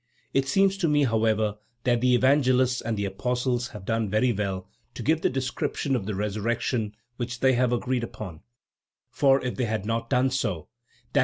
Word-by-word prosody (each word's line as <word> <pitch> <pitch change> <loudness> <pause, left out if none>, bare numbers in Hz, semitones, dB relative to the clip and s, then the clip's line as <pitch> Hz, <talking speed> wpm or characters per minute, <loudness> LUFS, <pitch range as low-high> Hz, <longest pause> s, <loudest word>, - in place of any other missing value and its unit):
It 135 0 +2
seems 195 +5 +3
to 175 - +2
me, 145 -1 +3
however, 110 -3 +1 0.2
that 120 -2 +2
the 125 0 +4
Evangelists 130 -1 +3
and 115 -1 -2
the 100 - -1
Apostles 125 +4 -1
have 105 -5 -10
done 110 -1 0
very 110 +4 +2
well 95 -3 -3 0.3
to - - -5
give 160 +1 +2
the - - +2
description 135 +1 -1
of 105 -6 -3
the 105 - -2
resurrection 105 +2 -1 0.2
which 125 0 -4
they 130 0 +5
have 125 0 +2
agreed 125 0 0
upon, 95 -8 -7 0.7
for 135 -1 +4
if 125 - -3
they 125 - +1
had 110 -3 -2
not 115 +1 -2
done 130 0 +2
so, 100 - -2 0.4
_i. - - +4
120 Hz, 185 wpm, -26 LUFS, 110-130 Hz, 0.7 s, they